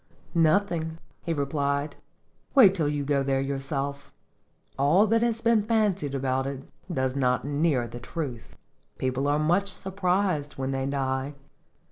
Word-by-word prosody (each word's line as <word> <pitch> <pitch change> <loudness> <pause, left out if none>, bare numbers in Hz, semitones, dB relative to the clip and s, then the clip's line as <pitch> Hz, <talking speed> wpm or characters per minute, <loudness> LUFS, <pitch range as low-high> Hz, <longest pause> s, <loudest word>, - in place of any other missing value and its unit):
"Nothing," 165 -1 +2 0.2
he 170 - -3
replied. 140 -1 -1 0.6
"Wait 215 -9 +8
till 165 -6 0
you 145 -1 -1
go 140 -1 +1
there 135 0 +1
yourself. 140 +1 -3 0.6
All 150 +10 +4
that 225 +1 +2
has 230 -1 0
been 230 -2 +4
fancied 205 - 0
about 135 0 0
it 135 -1 -5 0.3
does 130 -4 -1
not 125 -2 +1
near 145 -4 +1
the 120 +1 -8
truth. 125 -2 -6 0.4
People 130 +2 -1
are 145 +1 +2
much 175 +6 +2
surprised 185 -5 -1
when 135 0 -3
they 135 0 -1
die." 135 0 -2
145 Hz, 140 wpm, -27 LUFS, 135-180 Hz, 0.6 s, Wait